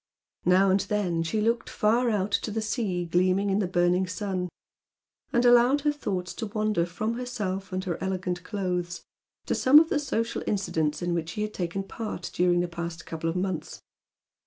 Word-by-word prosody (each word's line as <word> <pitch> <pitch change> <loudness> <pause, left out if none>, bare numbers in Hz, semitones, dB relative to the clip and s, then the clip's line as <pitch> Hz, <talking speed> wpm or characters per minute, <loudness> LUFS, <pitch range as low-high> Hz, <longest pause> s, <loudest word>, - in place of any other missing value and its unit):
Now 185 +2 +5
and 190 - +4
then 190 -4 0
she 165 +7 -1
looked 230 +2 0
far 235 +3 +2
out 205 -2 0
to 210 - 0
the 220 +1 -2
sea 205 -6 -1
gleaming 185 +3 +2
in 195 - +2
the 195 - 0
burning 180 +1 +2
sun, 185 -1 -3 0.8
and 240 +1 +2
allowed 245 +4 +6
her 295 +1 +2
thoughts 190 -11 -3
to 225 - -3
wander 215 -4 0
from 215 +7 -3
herself 200 -7 -3
and 185 0 -2
her 180 -1 -3
elegant 185 -2 -2
clothes 180 -3 -3 0.4
to - - 0
some 265 +3 +6
of 320 +1 +7
the 295 - +1
social 230 -5 -2
incidents 160 -6 0
in 175 0 0
which 165 -1 -2
she 210 +6 -3
had 215 - -4
taken 180 +2 -3
part 200 -3 -6
during 175 0 +3
the 175 - -1
past 170 -1 -6
couple 165 0 -3
of 165 - -3
months. 180 -3 -3
190 Hz, 185 wpm, -27 LUFS, 175-215 Hz, 0.8 s, of